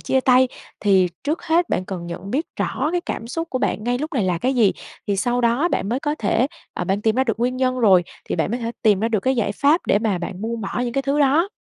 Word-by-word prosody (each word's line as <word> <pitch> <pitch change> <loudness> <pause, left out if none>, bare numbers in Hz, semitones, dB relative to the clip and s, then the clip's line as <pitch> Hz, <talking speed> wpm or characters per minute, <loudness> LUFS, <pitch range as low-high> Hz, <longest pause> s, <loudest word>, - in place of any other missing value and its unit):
chia 265 - +1
tay? 255 0 +4 0.3
Thì 190 -3 +4 0.2
trước 305 +3 -1
hết 340 +1 +2
bạn 185 - -1
cần 180 -3 -6
nhận 180 +3 -7
biết 300 +6 -1
rõ - - -1
cái 355 - +1
cảm 225 - -4
xúc 330 +6 -4
của 255 - -1
bạn 215 -4 -1
ngay 245 +1 0
lúc 310 +4 -4
này 225 -7 +1
là 180 -2 0
cái 260 +9 0
gì, 225 -6 +4 0.3
thì 200 - 0
sau 245 +5 0
đó 245 +8 +2
bạn 195 - -1
mới 245 +4 -1
có 295 0 -1
thể 225 +4 +2 0.3
ờ, - - -3
bạn 195 +3 -1
tìm 220 +1 +2
ra 260 - +3
được 225 -3 -1
nguyên 250 +2 0
nhân 255 0 0
rồi 190 -7 +5 0.2
thì - - -3
bạn - - 0
mới 240 +2 -2
thể 230 0 -3
tìm 210 -4 +4
ra 225 - +1
được 220 -3 0
cái 260 +4 +1
giải 205 -3 0
pháp 290 - +3
để 205 - +3
mà 210 -4 0
bạn 185 +2 -6
buông 230 +1 -3
bỏ 210 +4 -3
những 240 - -3
cái 275 - 0
thứ 280 +2 0
đó. 295 +6 +3
240 Hz, 285 wpm, -21 LUFS, 205-265 Hz, 0.3 s, rồi